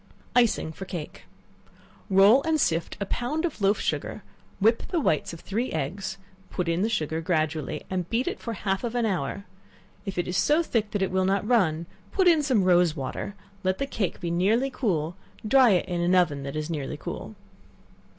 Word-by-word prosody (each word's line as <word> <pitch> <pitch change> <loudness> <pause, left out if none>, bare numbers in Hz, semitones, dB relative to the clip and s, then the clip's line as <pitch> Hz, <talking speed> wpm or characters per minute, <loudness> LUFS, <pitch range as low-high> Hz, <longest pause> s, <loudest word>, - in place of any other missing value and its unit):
Icing 235 -9 +3
for 190 +4 -8
Cake. 170 -5 -7 0.8
Roll 200 +7 +6
and 315 +1 +1
sift 165 - 0
a 200 - -1
pound 275 - -2
of 300 -10 -4
loaf 200 +2 +3
sugar; - - -2 0.4
whip 225 +3 +4
the 345 - 0
whites 155 - +1
of 170 0 -9
three 225 +6 -2
eggs; 190 +6 -3 0.3
put 180 -2 -2
in 170 +2 +1
the 220 - +1
sugar 160 -6 -1
gradually, 155 -3 -1
and 180 -2 -3
beat 235 +3 0
it - - -2
for 230 - -4
half 195 -1 -2
an 240 0 0
hour; 195 -1 -2 0.6
if 195 -3 -5
it 175 - 0
is 180 - -3
so 305 +9 +3
thick 220 -8 0
that 205 -2 -1
it 190 - -1
will 190 0 +2
not 195 +2 +1
run, 170 -9 +2 0.3
put 380 -2 +3
in 330 -3 +6
some 255 -9 +2
rose 175 -3 +4
water; 145 +7 -4 0.3
let 185 0 +1
the 275 - -1
cake 220 -8 -2
be 170 - -3
nearly 220 +10 +2
cool; 175 - -1 0.3
dry 260 +1 +6
it 185 -4 +3
in 175 -1 -1
an 175 +2 +3
oven 160 -6 +2
that 140 +1 -5
is 155 0 -2
nearly 150 -5 -4
cool. - - -7
190 Hz, 195 wpm, -26 LUFS, 170-230 Hz, 0.8 s, Roll